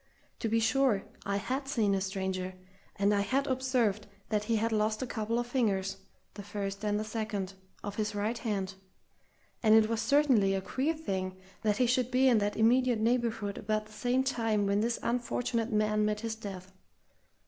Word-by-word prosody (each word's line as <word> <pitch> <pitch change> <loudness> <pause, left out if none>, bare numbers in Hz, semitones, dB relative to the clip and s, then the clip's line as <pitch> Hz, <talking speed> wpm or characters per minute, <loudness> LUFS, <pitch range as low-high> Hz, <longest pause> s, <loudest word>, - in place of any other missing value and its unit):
To 225 - -1
be 225 +1 +3
sure, 230 -3 +2 0.2
I 200 - 0
had 260 +7 -2
seen 225 -8 +1
a 195 - +1
stranger, 190 -1 -3 0.4
and 200 +1 +2
I 200 - +2
had 270 +7 +1
observed 255 -6 0 0.2
that 210 -1 0
he 230 - +1
had 225 +1 +1
lost 215 +2 +1
a - - -1
couple 225 -1 -2
of 240 - 0
fingers, 195 -6 0 0.4
the 205 - -8
first 200 0 -5
and 210 0 0
second, 215 -3 -3 0.3
of 205 -1 -5
his 215 0 -1
right 210 +3 0
hand; 195 -5 -2 0.9
and 220 -2 +6
it 220 -1 +6
was 225 0 -1
certainly 230 -6 +4
a 190 - -1
queer 275 +11 -1
thing 190 -11 -3 0.2
that 210 -2 +1
he 250 - +3
should 250 0 +2
be 255 +1 +4
in 240 -4 +5
that 205 0 -1
immediate 245 +2 +4
neighbourhood 225 -3 0
about 215 0 -1
the 245 +4 0
time 225 -6 +1
when 200 +1 +2
this 230 +1 0
unfortunate 235 -1 -1
man 215 0 +2
met 210 0 0
his 225 -1 -2
death. 195 -4 -8
215 Hz, 180 wpm, -31 LUFS, 205-240 Hz, 0.9 s, and